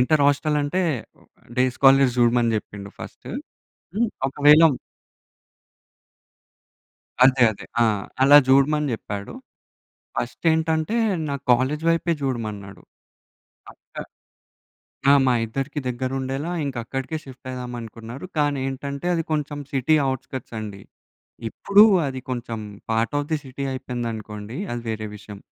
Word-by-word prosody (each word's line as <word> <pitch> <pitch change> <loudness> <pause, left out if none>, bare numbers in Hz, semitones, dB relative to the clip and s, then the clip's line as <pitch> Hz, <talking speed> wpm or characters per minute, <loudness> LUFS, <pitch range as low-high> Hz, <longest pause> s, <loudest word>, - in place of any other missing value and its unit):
Inter 145 +4 +3
హాస్టలంటే 150 +3 +1 0.8
day 125 - +4
scholars 135 -2 +5
చూడమని 120 -1 +3
జెప్పిండు 100 -1 -7
first. - - -10 0.7
హ్మ్. 235 +1 +2 0.2
ఒకవేళ 150 +2 +6 2.6
అదే. 130 0 +6
అదే. - - -11 0.2
ఆ! - - +5 0.4
అలా 140 +2 +8
జూడమని 145 +2 +4
జెప్పాడు. 100 - -5 0.8
ఫస్ట్ - - -4
ఏంటంటే, 160 +5 0 0.3
నా 140 - -1 0.2
కాలేజ్ 130 +6 +1
వైపే 165 0 +2
జూడమన్నాడు. 105 -7 -4 0.9
పక్క - - -18 1.2
ఆ! - - +9
మా 125 - +4
ఇద్దరికీ 135 +6 -4
దగ్గరుండేలా 130 +4 -3
ఇంక 135 -3 -4
అక్కడికే 135 +6 -4
షిఫ్ట్ 130 -1 -13
అయిదాం 125 -1 -6
అనుకున్నారు. 115 +5 -9
కానీ 145 -1 +1
ఏంటంటే 140 +3 -5
అది 165 - 0
కొంచెం 150 -1 -2
సిటీ 135 +4 +2 0.2
ఔట్‌స్కర్ట్స్ 130 -2 -6
అండి. 100 -2 -7 0.7
ఇప్పుడు 200 - +5 0.2
అది 130 -1 -4
కొంచెం 120 -2 -4 0.3
పార్ట్ 115 +5 0
ఆఫ్ 145 0 -3
ది - - +3
సిటీ 135 +1 -6
అయిపోయిందనుకోండి. 115 -3 -5 0.2
అది 120 -1 -4
వేరే 110 -1 -3
విషయం. 105 -1 -11
130 Hz, 115 wpm, -23 LUFS, 115-145 Hz, 2.6 s, ఆ